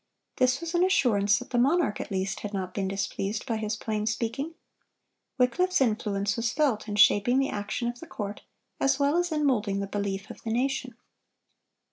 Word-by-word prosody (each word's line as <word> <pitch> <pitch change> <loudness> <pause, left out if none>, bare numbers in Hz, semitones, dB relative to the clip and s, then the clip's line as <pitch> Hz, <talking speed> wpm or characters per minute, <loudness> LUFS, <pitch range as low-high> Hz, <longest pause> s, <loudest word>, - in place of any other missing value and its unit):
This 255 +3 +2
was 335 0 -4
an 345 +1 +3
assurance 210 - +3
that 250 - -8
the 245 - +2
monarch 285 -1 +2
at - - -7
least 195 0 -2
had 210 -1 -5
not 185 -1 -3
been 195 -2 -1
displeased 195 +1 -3
by 230 -4 -1
his 215 0 -2
plain 215 -1 -3
speaking. 235 +8 -2 0.8
Wycliffe's 360 +9 +2
influence 210 -4 0
was 230 -1 0
felt 270 -8 +1
in 205 - -3
shaping 205 +4 +5
the 270 0 +2
action 210 +3 -3
of 240 0 -4
the 330 - -10
court, 205 - -5 0.4
as 270 0 +2
well 285 +2 +2
as 350 0 +1
in 300 -1 +1
moulding 210 -7 +1
the 200 - -1
belief 200 0 -3
of - - -12
the 225 - -5
nation. 255 0 -1
225 Hz, 190 wpm, -27 LUFS, 205-270 Hz, 0.8 s, shaping